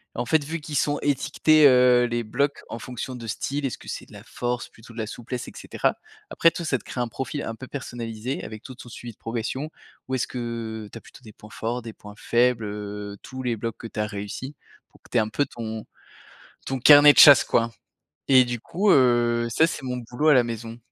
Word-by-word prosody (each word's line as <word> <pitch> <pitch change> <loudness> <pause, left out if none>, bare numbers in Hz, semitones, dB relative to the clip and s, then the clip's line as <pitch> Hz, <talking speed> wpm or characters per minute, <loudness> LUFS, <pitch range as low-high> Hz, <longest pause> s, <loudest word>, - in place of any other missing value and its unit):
en 120 - -2
fait, 160 0 +3
vu 160 +3 -4
qu'ils 150 0 -7
sont 145 +1 +1
étiquetés, 150 +2 +3
heu, 125 -1 +5
les 120 -1 -2
blocs, 140 +6 -1
en - - -5
fonction 125 +1 -6
de 120 - -8
style, 140 +6 -3
est-ce 130 - -4
que - - -15
c'est - - -6
de - - -19
la - - -11
force 120 0 -4
plutôt 115 +1 -16
de 115 - -9
la 110 - -2
souplesse 120 +2 -6
et - - -8
cetera, - - -1 0.3
après 165 - +4
toi 170 - -6
ça 145 -5 0
te - - -17
crée 125 - -5
un 120 - -1
profil 135 +5 -5
un 115 - -5
peu 130 - -9
personnalisé 120 -2 -5
avec 110 -1 -8
tout 130 +1 -10
ton 120 - -12
suivi 120 +1 -8
de - - -32
progression, 120 +6 -4 0.4
où 130 - -5
est-ce 130 -2 0
que 115 -3 -5
tu - - -9
as - - -11
plutôt - - -16
des 110 - -13
points 105 - -15
forts, 120 +3 -4
des 115 -1 -9
points 105 0 -13
faibles, 120 -1 +1
heu, 105 0 -6
tous 130 0 -7
les 125 -2 -1
blocs 115 +1 -4
que 115 - -7
tu 110 - -8
as 105 - +1
réussi 105 +7 -6 0.3
pour - - -23
que - - -21
tu 125 - 0
aies - - +5
un 110 - -2
peu 145 +6 0
ton 110 -2 -6 0.8
ton 135 - -2
carnet 145 +2 +9
de - - +3
chasse, 145 -4 +9
quoi 115 0 +1 0.6
et 130 -1 +7
du 120 -1 -4
coup, 195 - +1
heu, 120 -2 +3
ça, 160 +8 +3
c'est 155 - -5
mon 125 -1 -3
boulot 125 +5 -2
à 155 - +7
la 125 -3 +5
maison. 115 0 -6
120 Hz, 240 wpm, -24 LUFS, 115-135 Hz, 0.8 s, carnet